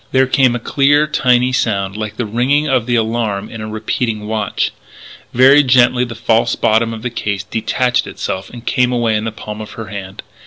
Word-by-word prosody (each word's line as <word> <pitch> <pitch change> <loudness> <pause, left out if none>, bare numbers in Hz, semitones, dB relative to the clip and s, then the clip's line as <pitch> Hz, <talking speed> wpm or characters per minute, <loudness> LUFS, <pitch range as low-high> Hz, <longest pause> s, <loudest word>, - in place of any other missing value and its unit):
There 130 0 +4
came 130 -2 +2
a - - -2
clear, 145 +4 +2
tiny 125 -4 +2
sound 100 -6 -1
like 110 0 -5
the 120 - -2
ringing 130 +7 +1
of 130 -4 +1
the 120 - +1
alarm 110 -3 -1
in 115 - -7
a 110 - -5
repeating 110 0 -3
watch. 105 -2 -1 0.6
Very 135 +4 +6
gently 125 -2 +3
the 120 -1 -8
false 115 0 +1
bottom 115 +1 +2
of 110 -1 -7
the 125 - -3
case 105 -3 -3
detached 120 +3 -1
itself 95 +1 -5
and 120 -1 -11
came 125 +1 +1
away 120 -3 +1
in 105 +1 -1
the 115 - -2
palm 105 0 -8
of 105 - -9
her 115 -1 -8
hand. 100 -2 -8
115 Hz, 200 wpm, -16 LUFS, 110-125 Hz, 0.6 s, Very